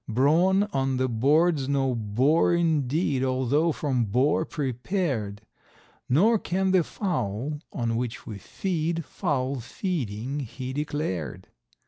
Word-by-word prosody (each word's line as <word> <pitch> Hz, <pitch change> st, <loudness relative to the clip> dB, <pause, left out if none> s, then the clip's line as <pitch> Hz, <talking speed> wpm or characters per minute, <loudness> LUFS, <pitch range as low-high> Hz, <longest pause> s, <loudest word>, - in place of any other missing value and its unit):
Brawn 165 Hz, -, +4 dB
on 135 Hz, -2 st, 0 dB
the 130 Hz, 0 st, +1 dB
board's 140 Hz, +5 st, +2 dB
no 135 Hz, -2 st, +1 dB
bore 125 Hz, +10 st, +2 dB
indeed 150 Hz, -4 st, +1 dB
although 130 Hz, +5 st, +2 dB
from 135 Hz, -6 st, 0 dB
boar 135 Hz, +9 st, +2 dB
prepared; 130 Hz, -, -2 dB, 0.7 s
Nor 205 Hz, -, +4 dB
can 190 Hz, +1 st, 0 dB
the 185 Hz, -2 st, +4 dB
fowl, 145 Hz, -, -3 dB
on 115 Hz, -2 st, -1 dB
which 120 Hz, -1 st, -3 dB
we 105 Hz, -3 st, -7 dB
feed, 165 Hz, -, -2 dB
foul 140 Hz, -6 st, -1 dB
feeding 125 Hz, -, -3 dB
he 130 Hz, 0 st, -6 dB
declared. 145 Hz, -, -3 dB
140 Hz, 115 wpm, -26 LUFS, 125-165 Hz, 0.7 s, Brawn